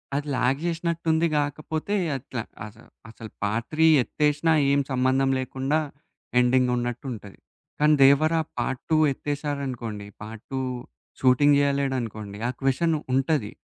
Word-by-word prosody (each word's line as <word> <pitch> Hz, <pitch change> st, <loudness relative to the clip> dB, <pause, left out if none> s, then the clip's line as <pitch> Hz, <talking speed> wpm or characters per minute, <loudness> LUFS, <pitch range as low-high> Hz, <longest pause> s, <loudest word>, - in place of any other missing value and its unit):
అది 145 Hz, +1 st, -2 dB
ల్యాగ్ 125 Hz, +2 st, +1 dB
జేసినట్టు 170 Hz, 0 st, -2 dB
ఉంది 160 Hz, +1 st, +2 dB
గాకపోతే, 155 Hz, +6 st, -2 dB, 0.2 s
అట్లా, 125 Hz, -2 st, -6 dB, 0.2 s
అసలు 110 Hz, +2 st, -14 dB, 0.2 s
అసలు 110 Hz, 0 st, -10 dB
పార్ట్ 110 Hz, +3 st, -1 dB
3 160 Hz, -, +6 dB, 0.2 s
ఎత్తేసినా 150 Hz, +4 st, +1 dB, 0.2 s
ఏం 140 Hz, -, +3 dB
సంబంధం 130 Hz, +1 st, +2 dB
లేకుండా 135 Hz, +3 st, -1 dB, 0.6 s
ఎండింగ్ 125 Hz, 0 st, +3 dB
ఉన్నట్టుంటది. 120 Hz, -4 st, -5 dB, 0.4 s
కానీ 150 Hz, +1 st, +5 dB
'దేవరా' 155 Hz, +4 st, +5 dB, 0.2 s
పార్ట్ 130 Hz, +2 st, -2 dB
2 160 Hz, -, +5 dB
ఎత్తేసారనుకోండి, 135 Hz, -8 st, -4 dB, 0.2 s
పార్ట్ 110 Hz, 0 st, -10 dB
2 -, -, -1 dB, 0.6 s
షూటింగ్ 140 Hz, +3 st, +5 dB
జేయలేడనుకోండి, 130 Hz, -8 st, -1 dB
ఆ -, -, 0 dB
క్వశ్చన్ 155 Hz, +5 st, +1 dB, 0.2 s
ఉంటది. 135 Hz, -4 st, +1 dB
135 Hz, 125 wpm, -25 LUFS, 120-150 Hz, 0.6 s, 3